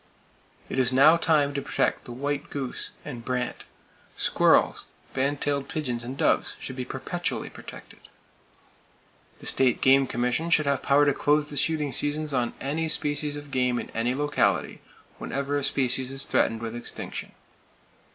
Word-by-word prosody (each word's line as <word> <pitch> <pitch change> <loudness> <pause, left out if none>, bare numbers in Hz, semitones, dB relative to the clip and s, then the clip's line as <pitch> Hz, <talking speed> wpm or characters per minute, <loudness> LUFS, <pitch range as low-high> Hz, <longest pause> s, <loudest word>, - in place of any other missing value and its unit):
It - - -2
is 125 -1 +3
now 140 +5 +7
time 150 -4 +2
to 140 - -2
protect - - -1
the - - -8
white 140 +3 -3
goose 135 -3 -4
and 125 -6 -7
brant. 125 0 -3 0.5
Squirrels, - - +3 0.3
band 140 +2 0
tailed 140 -1 -1
pigeons 125 -7 -2
and 130 +3 -6
doves - - +1
should 130 - -6
be 130 -1 -4
perpetually - - -4
protected. - - -12 1.4
The - - -14
State 130 -2 +3
Game 135 0 +5
Commission 125 +8 -1
should 155 -2 +3
have 140 -1 +1
power 145 +1 +4
to 145 - +3
close 150 +1 +1
the - - -6
shooting 150 0 0
seasons 150 +1 0
on 120 -2 0
any 155 +4 -2
species 145 -1 0
of 145 -1 -9
game 125 -2 +1
in - - -5
any 120 +3 -1
locality, 145 +1 0 0.4
whenever 140 +1 -2
a 145 - 0
species 130 -1 +1
is 135 0 -2
threatened 115 0 +1
with 115 0 -4
extinction. 120 - -6
140 Hz, 160 wpm, -26 LUFS, 125-145 Hz, 1.4 s, now